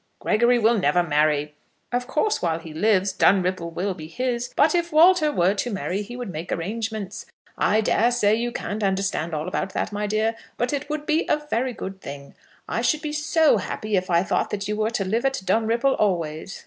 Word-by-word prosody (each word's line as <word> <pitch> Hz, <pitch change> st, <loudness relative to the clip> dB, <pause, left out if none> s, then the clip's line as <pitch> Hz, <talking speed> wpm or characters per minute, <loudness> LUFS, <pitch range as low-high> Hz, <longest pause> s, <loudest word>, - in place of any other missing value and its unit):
"Gregory 235 Hz, +3 st, +3 dB
will 230 Hz, 0 st, +3 dB
never 175 Hz, +1 st, +2 dB
marry. 150 Hz, -1 st, +1 dB, 0.4 s
Of 245 Hz, 0 st, -1 dB
course 315 Hz, +10 st, 0 dB
while 165 Hz, -2 st, 0 dB
he 165 Hz, -1 st, -10 dB
lives 195 Hz, +2 st, +2 dB
Dunripple 185 Hz, -3 st, +2 dB
will 185 Hz, +4 st, -2 dB
be 155 Hz, -4 st, -9 dB
his; 245 Hz, +5 st, -3 dB
but 300 Hz, +4 st, +4 dB
if 345 Hz, -1 st, 0 dB
Walter 320 Hz, 0 st, +5 dB
were 180 Hz, -5 st, +2 dB
to 210 Hz, +4 st, -2 dB
marry 195 Hz, -2 st, -2 dB
he 210 Hz, +4 st, -8 dB
would 245 Hz, -5 st, -5 dB
make 165 Hz, +2 st, -6 dB
arrangements. 215 Hz, +2 st, -4 dB, 0.3 s
I 215 Hz, +1 st, +2 dB
dare 225 Hz, +2 st, +2 dB
say 215 Hz, -4 st, +2 dB
you 235 Hz, +2 st, 0 dB
can't 215 Hz, -2 st, -4 dB
understand 190 Hz, -5 st, -1 dB
all 155 Hz, +2 st, -3 dB
about 185 Hz, +1 st, -3 dB
that, -, -, -2 dB
my 210 Hz, 0 st, -2 dB
dear; 215 Hz, +2 st, +1 dB, 0.2 s
but 245 Hz, +3 st, -1 dB
it 285 Hz, +1 st, -3 dB
would 300 Hz, 0 st, -3 dB
be 310 Hz, +2 st, +1 dB
a -, -, +3 dB
very 250 Hz, +2 st, 0 dB
good 190 Hz, -3 st, -7 dB
thing. 140 Hz, 0 st, -9 dB, 0.3 s
I -, -, -1 dB
should 305 Hz, 0 st, +1 dB
be 300 Hz, -1 st, -3 dB
so 305 Hz, -2 st, +3 dB
happy 210 Hz, +2 st, -3 dB
if 185 Hz, 0 st, -1 dB
I 170 Hz, 0 st, +3 dB
thought -, -, 0 dB
that 200 Hz, -1 st, -3 dB
you 210 Hz, -, -1 dB
were 215 Hz, +1 st, 0 dB
to 220 Hz, -4 st, -2 dB
live 225 Hz, +6 st, 0 dB
at 270 Hz, 0 st, 0 dB
Dunripple 230 Hz, +5 st, +2 dB
always." 170 Hz, -3 st, -1 dB
210 Hz, 210 wpm, -23 LUFS, 185-245 Hz, 0.4 s, Walter